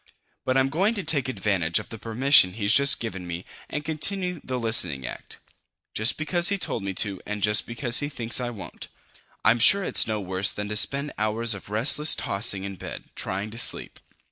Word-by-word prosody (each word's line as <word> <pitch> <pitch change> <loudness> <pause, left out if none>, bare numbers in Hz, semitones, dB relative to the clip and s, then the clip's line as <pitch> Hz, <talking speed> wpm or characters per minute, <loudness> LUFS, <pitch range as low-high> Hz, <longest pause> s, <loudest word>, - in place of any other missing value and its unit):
"But 130 0 +1
I'm 135 0 +2
going 195 +10 0
to 200 - -4
take 145 -5 0
advantage 95 -9 -1
of - - -5
the 115 - -9
permission 115 -2 +4
he's 100 0 0
just 140 +1 +5
given 95 -6 -6
me 85 +1 -6 0.2
and 150 0 -5
continue 180 +2 -1
the 130 - -4
listening 90 - -1
act. - - -8 0.6
Just 110 +2 0
because 175 +3 +2
he 200 - 0
told 150 - -3
me 95 -1 -5
to 100 -2 -2
and 105 -1 -5
just 105 0 +2
because 120 +1 0
he 145 - -3
thinks 120 -5 -1
I 120 - -3
won't. 110 -5 -9 0.6
I'm 120 - +4
sure 200 - +6
it's - - +5
no 110 -1 -2
worse 95 0 0
than 105 0 -5
to 105 - -3
spend 140 +7 +1
hours 110 +2 0
of 100 -1 -10
restless 130 +8 +3
tossing 100 -1 -2
in 100 -1 -7
bed, - - -9
trying 100 +3 -3
to 115 - -4
sleep." - - -1
115 Hz, 200 wpm, -24 LUFS, 100-140 Hz, 0.6 s, sure